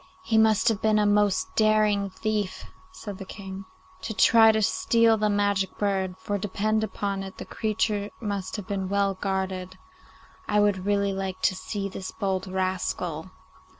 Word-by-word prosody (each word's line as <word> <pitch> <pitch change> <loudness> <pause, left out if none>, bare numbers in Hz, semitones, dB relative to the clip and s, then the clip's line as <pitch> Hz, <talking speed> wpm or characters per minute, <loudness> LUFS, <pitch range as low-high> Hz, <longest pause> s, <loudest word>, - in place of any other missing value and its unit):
'He 225 - -1
must 220 0 +4
have 220 -3 -1
been 215 -1 +3
a 210 - +3
most 205 -1 +2
daring 215 -2 +3
thief,' 210 -1 -3 0.3
said 210 - -8
the - - -5
King, 190 0 -8 0.4
'to 220 - -5
try 225 +1 +6
and 220 -1 +3
steal 230 - +3
the 215 -1 +1
magic 205 -2 0
bird, 190 -2 -1
for 205 +2 -3
depend 215 +2 0
upon 200 -1 -3
it 190 0 -8
the - - -7
creature 210 -2 -1
must 200 -4 -4
have 205 -3 -5
been 195 -2 -3
well 200 0 +1
guarded. 190 -1 -3 0.7
I 210 - +2
would 200 -2 +1
really 200 -1 +1
like 190 -1 -4
to 185 - +3
see 200 +1 -4
this 185 -1 -6
bold 190 -2 -2
rascal. 185 -3 -2
200 Hz, 165 wpm, -26 LUFS, 190-215 Hz, 0.7 s, try